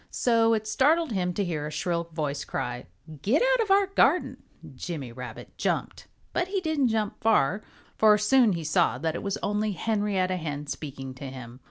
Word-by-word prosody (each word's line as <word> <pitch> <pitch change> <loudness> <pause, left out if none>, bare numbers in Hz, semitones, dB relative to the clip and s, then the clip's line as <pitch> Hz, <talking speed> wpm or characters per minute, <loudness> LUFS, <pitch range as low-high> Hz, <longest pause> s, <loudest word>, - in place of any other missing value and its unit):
So 230 -2 +3
it 220 0 -3
startled 295 +7 +2
him 180 -3 0
to 200 - 0
hear 155 -4 -3
a - - -6
shrill 170 +2 -1
voice 150 -4 -3
cry, 125 0 -4 0.3
"Get 245 - +2
out - - +3
of 435 - -2
our 395 +1 +5
garden!" 390 +1 +2 0.4
Jimmy 135 -2 -6
Rabbit 125 -2 -9
jumped. - - -2 0.3
But 350 - 0
he 390 +1 -1
didn't 315 -6 +1
jump 220 -2 -1
far, 210 -3 +3 0.4
for 215 -1 +6
he - - -5
soon 210 -9 +3
saw 150 -4 +2
that 160 +4 -1
it - - -4
was 200 -1 -2
only 210 0 0
Henrietta 195 -2 0
Hen 150 -3 -4
speaking 135 -3 -6
to 130 +2 -9
him. 125 -2 -9
190 Hz, 185 wpm, -27 LUFS, 150-225 Hz, 0.4 s, for